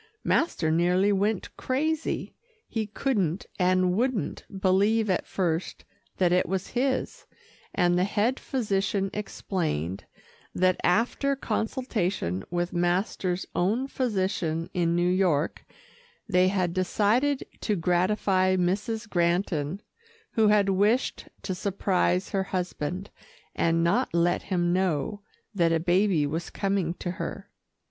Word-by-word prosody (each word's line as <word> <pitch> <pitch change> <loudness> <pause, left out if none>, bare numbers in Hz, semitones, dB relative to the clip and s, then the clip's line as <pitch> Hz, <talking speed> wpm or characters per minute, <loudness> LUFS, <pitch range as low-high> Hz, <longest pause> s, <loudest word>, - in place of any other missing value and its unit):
Master 175 - +1
nearly 180 +4 +3
went 205 0 0
crazy. 310 +4 -1 0.3
He 220 -2 -2
couldn't, 205 - -1
and 185 0 +3
wouldn't, 235 - -1
believe 200 +3 +3
at 180 - -1
first 170 -2 -2 0.3
that 180 -2 +3
it 180 +1 +2
was 190 -1 -2
his, 260 +2 -1 0.5
and 175 0 +3
the - - +3
head 210 +6 +1
physician 200 -5 -1
explained, 160 - -3 0.5
that 185 0 +2
after 240 +8 +2
consultation 210 - -2
with 175 0 -2
master's 180 +1 0
own 215 +9 +1
physician 190 -10 -1
in 170 -2 +1
New 175 0 +2
York, 180 -4 +1 0.6
they 185 -3 +4
had 185 -3 0
decided 215 +9 +1
to 210 - 0
gratify 185 +2 +2
Mrs. 205 +5 -1
Granton, 175 -2 0 0.5
who 220 -1 +3
had 205 -1 +4
wished 205 +6 +1 0.2
to 190 - -2
surprise 185 -1 0
her 195 -2 0
husband, 180 0 -3 0.4
and 165 0 +1
not 170 0 +1
let 170 +1 +2
him 175 -2 0
know 185 +1 0 0.3
that 170 -4 +2
a 165 - +2
baby 175 -1 +2
was 160 +4 -3
coming 195 -4 -1
to 175 - -4
her. 185 - -6
185 Hz, 120 wpm, -27 LUFS, 175-210 Hz, 0.6 s, they